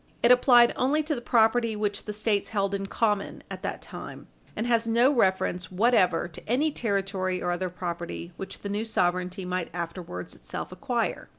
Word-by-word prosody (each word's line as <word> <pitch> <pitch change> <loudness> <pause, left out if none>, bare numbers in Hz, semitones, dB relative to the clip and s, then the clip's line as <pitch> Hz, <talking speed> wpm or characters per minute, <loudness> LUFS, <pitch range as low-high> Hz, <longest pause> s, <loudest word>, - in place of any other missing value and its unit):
It 240 - +6
applied 245 -1 +6
only 295 +5 +2
to 305 +1 -1
the 245 - -4
property 230 -1 +3
which 210 -1 -2
the 210 - -3
States 210 -1 0
held 200 -2 0
in 195 0 -2
common 210 -1 -1
at - - -6
that - - -4
time, - - -9 0.3
and 220 - -2
has 230 -1 +2
no 235 +4 +4
reference 190 -6 +1
whatever 185 -4 +3
to 170 +4 -13
any 290 +6 +2
territory 195 -6 -1
or 175 - -1
other 180 +1 -2
property 170 -1 -5
which 195 - -7
the 200 - -5
new 205 +2 -1
sovereignty 180 -2 -1
might 180 -1 -2
afterwards 170 - -5
itself - - -7
acquire. - - -2
200 Hz, 180 wpm, -27 LUFS, 180-235 Hz, 0.3 s, It